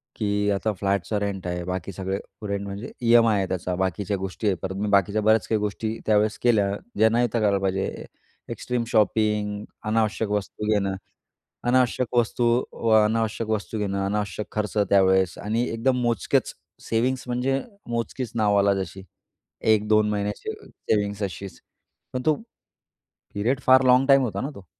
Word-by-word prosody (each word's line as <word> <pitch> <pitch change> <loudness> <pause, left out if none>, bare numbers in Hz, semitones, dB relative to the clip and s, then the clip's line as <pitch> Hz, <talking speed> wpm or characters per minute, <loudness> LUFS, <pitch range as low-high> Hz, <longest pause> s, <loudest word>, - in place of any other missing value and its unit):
की 105 -1 0
आता 100 +2 0
फ्लॅटचा 100 +1 -1
रेंट 100 -3 -3
आहे. 90 0 -3
बाकी 90 +1 -4
सगळे, 95 +1 -3 0.3
रेंट 100 0 -2
म्हणजे 100 +3 -6
ई-एम-आय 115 -2 +5
आहे 95 -1 0
त्याचा. 90 0 -2
बाकीच्या 95 +2 -1
गोष्टी 95 +3 -4
आहेत 95 -3 +2
परत. 95 0 -4
मी 105 +2 -2
बाकीच्या 100 +1 +2
बऱ्याच 110 +1 +3
काही 110 - +1
गोष्टी 110 +2 -3
त्यावेळेस 105 0 +2
केल्या, 105 -5 +3 0.3
ज्यां 110 +1 +5
नव्हत्या 120 0 +1
करायला 100 -2 +2
पाहिजे. 95 0 -2 0.4
एक्स्ट्रीम 125 -1 -2
शॉपिंग, 105 -1 +1 0.2
अनावश्यक 110 0 0
वस्तू 105 +1 -3
घेणं. 100 -2 +1 0.7
अनावश्यक 125 0 +1
वस्तू 120 +1 +1 0.3
व 115 - -2
अनावश्यक 110 0 -1
वस्तू 110 0 -2
घेणं, 100 -1 -1
अनावश्यक 105 +1 -2
खर्च 105 0 -3
त्यावेळेस 95 -2 +4
आणि 110 +3 -1
एकदम 125 +3 0
मोजकेच, 120 -2 0 0.3
सेव्हिंग्स 125 +3 0
म्हणजे 130 +2 0 0.3
मोजकीच 120 0 -3
नावाला 100 -3 +3
जशी. 95 +1 -9 0.6
1-2 105 0 +3
महिन्याची 105 0 -3
सेविंग्स 105 -1 -2
अशीच. 95 0 -5 0.5
पण 125 - -3
तो 155 - +5 1.0
पिरेड 120 +7 0
फार 130 0 +7
लाँग 125 +1 +5
टाइम 135 -1 +6
होता 120 -5 -2
ना 135 - -3
तो. 100 -5 -13
105 Hz, 150 wpm, -24 LUFS, 100-115 Hz, 1.0 s, फार